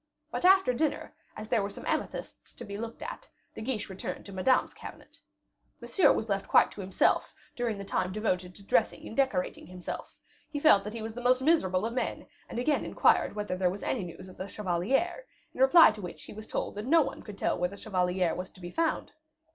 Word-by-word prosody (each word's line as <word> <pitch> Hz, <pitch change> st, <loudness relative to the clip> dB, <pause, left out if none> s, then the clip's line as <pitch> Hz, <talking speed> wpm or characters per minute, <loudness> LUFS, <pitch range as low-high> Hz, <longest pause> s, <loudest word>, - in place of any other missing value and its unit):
But -, -, -2 dB
after 380 Hz, -8 st, +6 dB
dinner, 305 Hz, +5 st, -1 dB, 0.2 s
as 215 Hz, -, -6 dB
there 220 Hz, -, +2 dB
were 200 Hz, -, -2 dB
some -, -, -10 dB
amethysts -, -, -4 dB
to -, -, -9 dB
be 200 Hz, -, -7 dB
looked 225 Hz, +2 st, -6 dB
at, -, -, -7 dB, 0.2 s
De -, -, -8 dB
Guiche 225 Hz, -2 st, -2 dB
returned 190 Hz, -1 st, -6 dB
to 200 Hz, -, -10 dB
Madame's 195 Hz, +7 st, +2 dB
cabinet. -, -, -12 dB, 0.6 s
Monsieur 385 Hz, -, +4 dB
was 220 Hz, -, -1 dB
left 195 Hz, -2 st, -1 dB
quite -, -, +5 dB
to 205 Hz, -, -8 dB
himself 190 Hz, 0 st, +1 dB, 0.2 s
during 235 Hz, -4 st, -1 dB
the 200 Hz, -, -7 dB
time 185 Hz, -1 st, -1 dB
devoted 185 Hz, -3 st, -2 dB
to 200 Hz, -, -14 dB
dressing 175 Hz, -3 st, +1 dB
and -, -, -8 dB
decorating 260 Hz, -10 st, 0 dB
himself; 180 Hz, -1 st, -7 dB, 0.3 s
he 295 Hz, -2 st, -3 dB
felt 285 Hz, -10 st, +6 dB
that 210 Hz, +2 st, -5 dB
he 225 Hz, -, -5 dB
was 220 Hz, 0 st, -5 dB
the 245 Hz, -, -7 dB
most 250 Hz, +1 st, +4 dB
miserable 205 Hz, -, +3 dB
of 230 Hz, -, -2 dB
men, 250 Hz, -, -2 dB, 0.2 s
and -, -, -6 dB
again 285 Hz, +5 st, +1 dB
inquired -, -, +3 dB
whether 210 Hz, -3 st, -2 dB
there 180 Hz, -1 st, +2 dB
was 195 Hz, +3 st, -6 dB
any 235 Hz, -, -1 dB
news 180 Hz, +2 st, -9 dB
of 185 Hz, -, -13 dB
the 190 Hz, -, -5 dB
chevalier, 215 Hz, -, -1 dB, 0.3 s
in -, -, -5 dB
reply 270 Hz, +1 st, +8 dB
to 215 Hz, -1 st, -9 dB
which 180 Hz, -2 st, -8 dB
he -, -, -10 dB
was 215 Hz, +1 st, -9 dB
told -, -, -3 dB
that 210 Hz, +3 st, -6 dB
no 325 Hz, +2 st, +6 dB
one -, -, -6 dB
could 210 Hz, -2 st, -10 dB
tell -, -, +1 dB
where 180 Hz, 0 st, +1 dB
the 200 Hz, -, -10 dB
chevalier 180 Hz, -4 st, 0 dB
was 185 Hz, +1 st, -5 dB
to -, -, -19 dB
be 175 Hz, -1 st, -7 dB
found. 330 Hz, -1 st, -1 dB
210 Hz, 225 wpm, -29 LUFS, 185-255 Hz, 0.6 s, reply